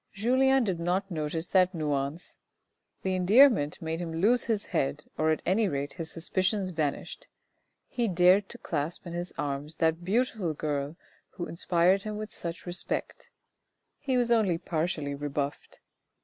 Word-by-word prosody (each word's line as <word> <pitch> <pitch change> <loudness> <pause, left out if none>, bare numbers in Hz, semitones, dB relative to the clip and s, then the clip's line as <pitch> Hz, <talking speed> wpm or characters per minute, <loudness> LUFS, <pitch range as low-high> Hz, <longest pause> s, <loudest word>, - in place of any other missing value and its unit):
Julien 260 +5 +3
did 190 -6 -1
not 185 +3 -1
notice 160 +1 -2
that 185 -1 +3
nuance. 150 +1 -3 0.6
The 190 - 0
endearment 185 - +4
made 160 +1 -2
him 170 -2 -4
lose 220 +9 +3
his 215 -3 -1
head, 145 +2 -1
or 155 0 +1
at 155 - 0
any 205 +3 +2
rate 140 -3 -3
his 165 -1 -6
suspicions 185 +4 -1
vanished. 155 -4 -3 0.6
He 240 -2 -1
dared 185 +2 +4
to 235 - -7
clasp 160 -5 -3
in 170 - -6
his 175 +1 -3
arms 145 +2 -3
that 165 +1 +1
beautiful 200 -4 0
girl 145 0 -2 0.4
who 175 - -4
inspired 175 +3 +2
him 210 +1 -5
with 215 0 -6
such 170 -1 -6
respect. 175 0 -3 0.7
He 265 -3 0
was 240 -1 +1
only 210 -7 +3
partially 160 -4 -2
rebuffed. 145 0 -4
175 Hz, 150 wpm, -28 LUFS, 155-200 Hz, 0.7 s, endearment